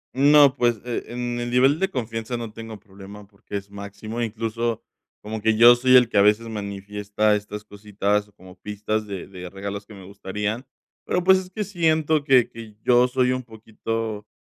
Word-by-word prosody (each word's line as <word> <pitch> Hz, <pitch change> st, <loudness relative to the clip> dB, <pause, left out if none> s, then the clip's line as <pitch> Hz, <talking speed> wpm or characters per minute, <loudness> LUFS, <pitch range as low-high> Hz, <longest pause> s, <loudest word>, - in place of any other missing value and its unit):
No, 140 Hz, 0 st, +6 dB
pues, 120 Hz, -4 st, +1 dB
e 120 Hz, -1 st, -3 dB
en 120 Hz, 0 st, -4 dB
el 120 Hz, 0 st, -3 dB
nivel 130 Hz, +5 st, +3 dB
de 190 Hz, -, +1 dB
confianza 115 Hz, -, -4 dB
no 115 Hz, -2 st, -7 dB
tengo 115 Hz, -1 st, -9 dB
problema, 100 Hz, 0 st, -13 dB
porque 100 Hz, 0 st, -8 dB
es 100 Hz, 0 st, -9 dB
máximo. 100 Hz, +3 st, -7 dB
Incluso, 115 Hz, 0 st, -2 dB, 0.4 s
como 110 Hz, +1 st, -5 dB
que 110 Hz, 0 st, +2 dB
yo 120 Hz, +2 st, +9 dB
soy 130 Hz, +1 st, +4 dB
el 125 Hz, -1 st, +7 dB
que 110 Hz, -3 st, +1 dB
a -, -, +7 dB
veces 105 Hz, +3 st, +3 dB
manifiesta 105 Hz, 0 st, -1 dB
estas 105 Hz, 0 st, -6 dB
cositas 105 Hz, 0 st, -2 dB
como 95 Hz, 0 st, -14 dB
pistas 105 Hz, +1 st, -3 dB
de 100 Hz, -3 st, -6 dB
de 90 Hz, -2 st, -9 dB
regalos 100 Hz, +1 st, -6 dB
que 105 Hz, -, -12 dB
me 95 Hz, -2 st, -12 dB
gustarían, 105 Hz, +5 st, -4 dB, 0.4 s
pero, 180 Hz, -, -1 dB
pues, 190 Hz, +1 st, +6 dB
es 185 Hz, -1 st, -9 dB
que 210 Hz, +3 st, -4 dB
siento 160 Hz, -5 st, +1 dB
que 130 Hz, -4 st, +4 dB
que 115 Hz, -2 st, -11 dB
yo 125 Hz, 0 st, +4 dB
soy 125 Hz, 0 st, +1 dB
un 130 Hz, 0 st, -1 dB
poquito 110 Hz, -2 st, -5 dB
110 Hz, 185 wpm, -23 LUFS, 105-125 Hz, 0.4 s, yo